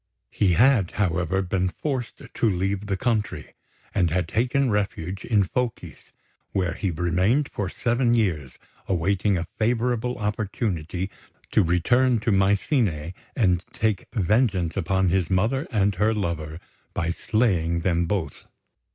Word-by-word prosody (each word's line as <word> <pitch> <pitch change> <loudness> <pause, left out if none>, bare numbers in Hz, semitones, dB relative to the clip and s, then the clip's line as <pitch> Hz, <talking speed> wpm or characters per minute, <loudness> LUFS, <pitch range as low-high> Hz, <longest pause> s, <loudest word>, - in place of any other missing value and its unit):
He 95 -4 +2
had, 115 -2 +4
however, 95 -1 0
been 95 0 0
forced 130 +4 -4
to 115 - +2
leave 95 +2 -1
the 100 -1 -1
country, 110 -2 -2 0.4
and 90 -4 +2
had 90 +1 0
taken 125 - +1
refuge 95 -3 -2
in 105 -4 +3
Phocis, 120 +4 -4 0.4
where 90 -3 0
he 95 - -2
remained 90 - +1
for 100 -3 -2
seven 120 +3 +1
years, 80 - 0 0.3
awaiting 95 +2 +1
a 85 - -2
favourable 120 +2 0
opportunity 100 -4 -2 0.4
to - - +4
return 115 +8 +3
to 110 - +1
Mycene 95 - +1 0.2
and 90 -7 +2
take 110 -3 -1
vengeance 100 -4 +1
upon 95 0 +1
his 90 -2 +1
mother 115 - +1
and 100 -2 +2
her 105 +4 +1
lover 85 -5 -3 0.4
by 85 +1 0
slaying 85 -6 +1
them 85 -1 +1
both. 95 -3 -3
100 Hz, 135 wpm, -24 LUFS, 90-115 Hz, 0.4 s, had